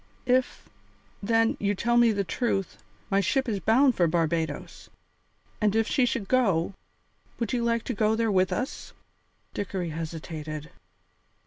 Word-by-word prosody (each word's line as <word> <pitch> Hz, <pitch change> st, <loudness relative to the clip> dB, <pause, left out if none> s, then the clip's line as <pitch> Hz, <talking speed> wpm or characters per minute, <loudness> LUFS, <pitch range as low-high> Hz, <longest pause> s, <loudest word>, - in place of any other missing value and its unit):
"If, 255 Hz, 0 st, +1 dB, 0.5 s
then, 225 Hz, +2 st, +2 dB
you 205 Hz, 0 st, 0 dB
tell 235 Hz, +5 st, 0 dB
me 240 Hz, -1 st, +6 dB
the 200 Hz, -2 st, 0 dB
truth, 195 Hz, 0 st, -2 dB, 0.3 s
my 195 Hz, -, +4 dB
ship 265 Hz, +7 st, +1 dB
is 210 Hz, -4 st, -1 dB
bound 255 Hz, +6 st, +4 dB
for 175 Hz, -5 st, +2 dB
Barbadoes. 160 Hz, -2 st, -2 dB, 0.7 s
And 210 Hz, 0 st, +2 dB
if 225 Hz, 0 st, +2 dB
she 260 Hz, -4 st, +2 dB
should 235 Hz, -5 st, -2 dB
go, 195 Hz, -9 st, +2 dB, 0.6 s
would 230 Hz, 0 st, -2 dB
you 240 Hz, -1 st, 0 dB
like 230 Hz, -1 st, +1 dB
to 250 Hz, -, -3 dB
go 215 Hz, 0 st, +2 dB
there 225 Hz, -1 st, +1 dB
with 185 Hz, -1 st, +2 dB
us?" 255 Hz, +3 st, -4 dB, 0.6 s
Dickory 190 Hz, -4 st, -3 dB
hesitated. 155 Hz, -1 st, -6 dB
210 Hz, 145 wpm, -27 LUFS, 175-235 Hz, 0.7 s, me